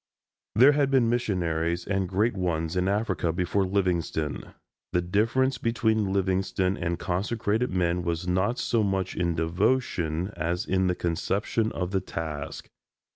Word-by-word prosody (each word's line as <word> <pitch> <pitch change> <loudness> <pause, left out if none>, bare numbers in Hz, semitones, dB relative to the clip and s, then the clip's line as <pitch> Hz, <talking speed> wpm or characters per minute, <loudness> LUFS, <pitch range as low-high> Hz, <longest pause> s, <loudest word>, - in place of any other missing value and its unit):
There 130 +7 +8
had 145 -2 +2
been 125 -4 +3
missionaries, 85 -7 0
and 95 -2 -1
great 105 +4 +1
ones, 85 -3 -1
in 90 +1 +1
Africa 100 -4 0
before 90 +3 0
Livingstone. 90 -5 -1 0.4
The 90 - +3
difference 115 +7 +1
between 110 -3 +1
Livingstone 95 -1 0
and 85 -1 -2
consecrated 105 +5 -1
men 90 -1 0
was 85 +1 -2
not 95 +7 +1
so 115 - +1
much 95 -2 -1
in 85 -2 0
devotion 85 0 0
as 85 +5 -2
in 95 0 +1
the 90 - +1
conception 100 +6 -1
of 90 0 -3
the 95 -1 +1
task. 80 -5 -5
95 Hz, 140 wpm, -27 LUFS, 85-110 Hz, 0.4 s, There